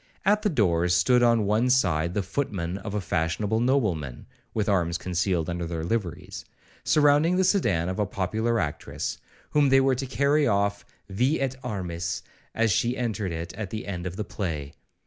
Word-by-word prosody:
At 210 +2 +4
the 210 - +1
doors 90 - +2
stood 120 +8 +4
on 115 -3 +4
one 110 +5 +2
side 90 -9 +2
the 105 - 0
footmen 95 -4 -3
of 100 +1 -6
a 105 - 0
fashionable 90 +6 0
nobleman, 105 - 0 0.3
(with 110 -2 -1
arms 85 -4 +1
concealed 90 -2 -1
under 85 -1 -3
their 80 -1 -4
liveries), 90 -2 -3 0.4
surrounding 150 +3 +4
the 190 - +3
sedan 115 - +2
of 95 +3 -3
a 105 - +1
popular 110 +5 -1
actress1, 80 -7 -3 0.3
whom 145 -2 +4
they 135 0 +6
were 135 0 +3
to 130 +1 -3
carry 140 +3 +2
off 100 -1 0 0.2
vi 125 +10 +1
et 135 -1 -1
armis, 85 -4 -3 0.3
as 115 -1 +2
she 120 +6 +1
entered 110 -6 -2
it 85 +1 -5
at 100 -1 -5
the 110 +2 -5
end 90 -3 -4
of 90 - -6
the 105 - -3
play. 75 -7 -4
100 Hz, 180 wpm, -26 LUFS, 85-125 Hz, 0.4 s, they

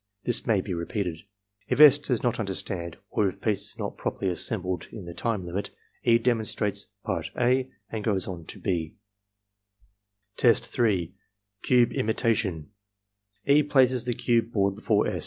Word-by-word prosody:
This 120 +1 -2
may 105 -5 +3
be 95 - -4
repeated. 85 -1 -3 0.5
If - - -1
S. 150 -1 +9
does 125 -5 -1
not 120 -1 0
understand, 95 -4 -3
or 100 -2 +2
if - - -11
pieces 105 -3 -1
are - - -4
not - - -5
properly 95 - -1
assembled 90 -1 -2
in 100 -5 -8
the 85 - -7
time 105 -2 -2
limit, 90 +4 -3 0.3
E. 115 -1 +5
demonstrates 110 -3 -1 0.2
part - - -2
(a) 125 +1 +2 0.2
and 110 -2 -4
goes 100 -4 0
on 85 -4 -6
to - - -8
(6). 80 -4 -2 1.4
Test 115 -1 +4
3. 100 -8 0 0.3
— 100 0 -54
Cube 125 -2 +4
Imitation 110 - 0 0.7
E. 145 +2 +5
places 130 -4 +3
the 120 -1 -1
cube 115 -1 +1
board 100 -3 +2
before 105 0 +1
S. - - -2
105 Hz, 160 wpm, -27 LUFS, 95-120 Hz, 1.4 s, S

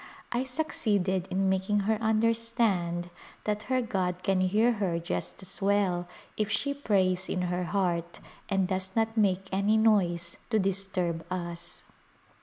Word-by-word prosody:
I 245 +2 0
succeeded 205 - 0
in 190 +1 +1
making 190 +2 +1
her 215 +2 +1
understand 220 -6 +1 0.3
that 210 0 -1
her 255 -1 +2
god 185 -4 -2
can 190 -1 +2
hear 210 +6 +3
her 175 -4 +1
just 170 +3 -4
as 190 +2 -6
well 195 -3 +2 0.3
if 215 -1 0
she 280 +7 +1
prays 190 -9 +1
in 180 - -1
her 180 0 -1
heart 175 -3 -1 0.3
and 195 -2 +2
does 190 0 -2
not 225 0 +1
make 195 -3 +2
any 200 +3 +2
noise 175 -6 +2
to 220 - +2
disturb 190 -4 -1
us. 170 -1 -4
195 Hz, 145 wpm, -29 LUFS, 180-215 Hz, 0.3 s, hear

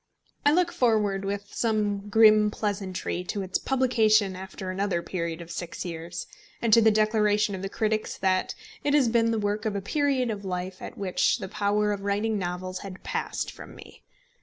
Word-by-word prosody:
I 290 - +5
look 345 +2 +2
forward 210 -5 +1
with 200 +1 -4
some 210 -3 0
grim 215 -1 +6
pleasantry 195 -4 -3
to 200 +2 -3
its 185 - -1
publication 220 -7 +3
after 190 0 -6
another 185 -2 -1
period 170 -2 -3
of 170 0 -9
six 175 +1 -5
years, 170 0 -5 0.3
and 230 -2 +1
to 230 - +8
the 220 - +6
declaration 210 -1 +2
of 190 - -5
the 195 - -4
critics 215 +1 -1
that 185 -1 0 0.3
it 290 0 +2
has 275 -5 +4
been 230 0 +3
the 225 - +1
work 205 0 -1
of 215 -3 -1
a - - 0
period 265 +2 0
of 205 -2 -5
life 185 0 -4
at - - -8
which 195 +2 +1
the 195 -5 -6
power 210 +1 +1
of 200 -1 -3
writing 205 +2 0
novels 185 0 -4
had 195 -2 -9
passed - - -3
from - - -12
me. - - -14
205 Hz, 185 wpm, -27 LUFS, 190-220 Hz, 0.3 s, to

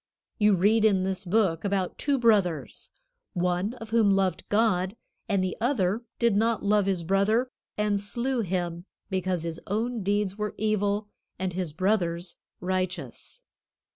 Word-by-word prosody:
You 210 -1 +5
read 210 +5 +3
in 195 -4 +4
this 190 0 -2
book 185 -3 +1
about 195 -2 -1
two 285 -2 +1
brothers, 205 -9 +1 0.4
one 180 +4 0
of 225 -2 -10
whom 225 -3 +4
loved 190 -3 0
God, 205 -2 +2 0.3
and 195 -2 +2
the 185 - -2
other 225 -4 +1 0.2
did 235 -3 +2
not 225 0 +1
love 205 -1 +3
his 185 -3 0
brother, 205 +8 +2 0.3
and 210 -1 +1
slew 240 +5 -1
him 175 -4 -2 0.3
because 185 -2 -1
his 165 -1 -4
own 225 +3 -1
deeds 200 0 0
were 210 0 -2
evil 210 -1 0 0.3
and 185 -1 -2
his 180 -3 -2
brother's 175 -1 0 0.2
righteous. 180 -7 -3
200 Hz, 145 wpm, -27 LUFS, 185-215 Hz, 0.4 s, You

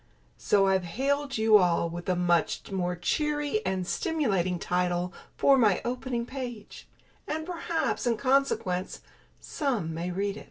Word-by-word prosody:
So 200 -1 +3
I've 190 -1 +2
hailed 275 +8 -1
you 220 -1 +6
all 170 -2 +2
with 175 +2 -6
a 180 - +2
much 175 +1 0
more 180 -2 -1
cheery 295 - -1
and 185 -1 -1
stimulating 195 - 0
title 180 +1 -1 0.2
for 275 -1 +5
my 210 -6 +4
opening 245 -1 -2
page; 245 -5 -7 0.4
and 315 +1 -3
perhaps, 335 -6 -2
in 230 -2 +2
consequence, 230 -9 0 0.4
some 235 - -2
may 170 +2 -3
read 200 +3 -2
it. - - -6
210 Hz, 145 wpm, -28 LUFS, 180-275 Hz, 0.4 s, you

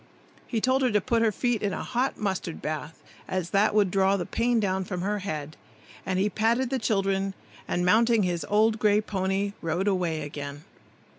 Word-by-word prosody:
He 230 - -1
told 260 +4 +2
her 255 - +3
to 210 -2 +3
put 230 +3 0
her 225 -1 +3
feet 240 +1 0
in 200 -2 -1
a - - -4
hot 255 +2 -1
mustard 190 -5 -3
bath, 155 +1 -5 0.2
as 185 -2 -3
that 205 +1 +3
would 205 -4 +3
draw 195 +1 +3
the 175 - -3
pain 235 +4 +1
down 190 -2 0
from 180 -1 -4
her 205 +2 -1
head; 155 -5 -5 0.5
then 190 -1 -1
he 195 +2 +2
patted 235 +5 +1
the 265 - 0
children, 195 -3 0 0.3
and 175 0 0
mounting 225 +3 +4
his 175 -2 -1
old 215 +1 +3
gray 210 -1 +4
pony, 195 -1 -1
rode 170 +4 -1
away 175 -5 0
again. 145 0 -7
195 Hz, 195 wpm, -27 LUFS, 180-220 Hz, 0.5 s, mounting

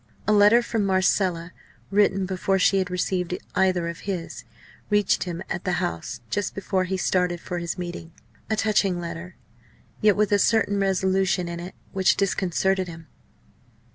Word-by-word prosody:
A 215 - +4
letter 210 +3 +6
from 225 -2 -1
Marcella 185 -2 +1 0.4
written 195 -1 +3
before 190 +1 0
she 195 +1 +3
had 185 - -1
received 180 -1 -1 0.2
either 185 -3 +2
of 170 +1 -5
his 175 -4 -5 0.4
reached 205 -3 +2
him 175 0 -5
at 175 - -4
the 185 - -1
House 110 - -3
just 205 -1 -2
before 190 -1 -1
he 190 +1 -2
started 180 -1 0
for 175 +1 -4
his 170 +1 -4
meeting. 175 -2 -6 0.4
A 220 - +1
touching 205 -4 +1
letter! 170 +1 -7 0.7
yet 210 -3 +5
with 210 -1 +1
a 205 - +4
certain 205 -1 +2
resolution 190 -1 +1
in 170 0 -5
it 180 +2 -8 0.2
which 190 -1 +2
disconcerted 190 -1 0
him. 165 -1 -10
185 Hz, 160 wpm, -24 LUFS, 175-195 Hz, 0.7 s, letter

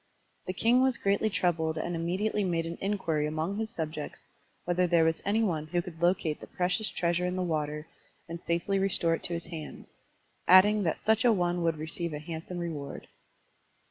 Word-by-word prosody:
The 185 - -2
king 235 +6 +3
was 260 -2 +3
greatly 200 +2 +1
troubled 160 -5 0
and 170 +2 -2
immediately 190 +6 0
made 170 -3 0
an 170 +1 -6
inquiry 170 -7 0
among 160 +5 -2
his 220 0 -2
subjects 155 -6 -5 0.5
whether 180 +1 +2
there 170 -1 +4
was 160 0 +1
any 215 +3 +2
one 160 -7 -1
who 175 +2 0
could 170 -1 -7
locate 175 -3 +1
the - - -9
precious 180 +4 0
treasure 175 +1 0
in 180 - -2
the 185 - -1
water 150 -2 -2 0.4
and 170 0 -7
safely 170 +4 0
restore 185 -4 +2
it - - -2
to 175 - -2
his 170 0 -4
hands, 165 -2 -9 0.5
adding 205 +4 +7
that 165 -5 0
such 220 0 +2
a 240 - +6
one 175 -3 +1
would 165 -2 +1
receive 160 +2 -3
a 150 - -4
hand 160 +1 -7
some 180 - -5
reward. 155 -5 -5
175 Hz, 195 wpm, -29 LUFS, 160-190 Hz, 0.5 s, adding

